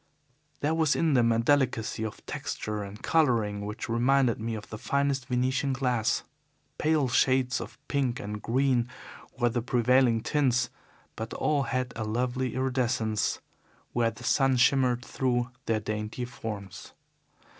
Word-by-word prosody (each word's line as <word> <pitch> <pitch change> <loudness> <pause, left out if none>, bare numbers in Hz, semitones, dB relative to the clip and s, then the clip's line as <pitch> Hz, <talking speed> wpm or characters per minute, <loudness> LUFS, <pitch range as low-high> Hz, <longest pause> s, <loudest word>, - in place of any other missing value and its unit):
There 150 +2 +1
was 160 -2 +2
in 160 -3 +2
them 120 -3 +4
a 115 - +2
delicacy 120 -3 +1
of 110 - -6
texture 105 -1 -4
and 100 +1 -8
colouring 115 -10 +2
which 105 - -5
reminded 120 +1 +2
me 115 +1 -3
of 110 - -7
the 110 - -6
finest 140 -1 0
Venetian 130 +2 0
glass. 125 -4 0 0.6
Pale 155 -4 +2
shades 130 0 +2
of - - -9
pink 135 -4 0
and 105 +1 -5
green 125 0 +1 0.5
were 120 - +2
the 120 +1 -1
prevailing 125 -1 +3
tints, 130 -4 +1 0.4
but 110 0 -5
all 150 -2 +1
had 130 -1 -2
a 110 - -3
lovely 125 +3 -1
iridescence 125 -5 0 0.5
where 120 -1 +2
the 120 - -11
sun 135 +1 +3
shimmered 125 -1 +3
through 125 -1 -1 0.2
their 115 -1 +2
dainty 105 +3 -4
forms. 105 -5 -7
125 Hz, 145 wpm, -28 LUFS, 115-130 Hz, 0.6 s, them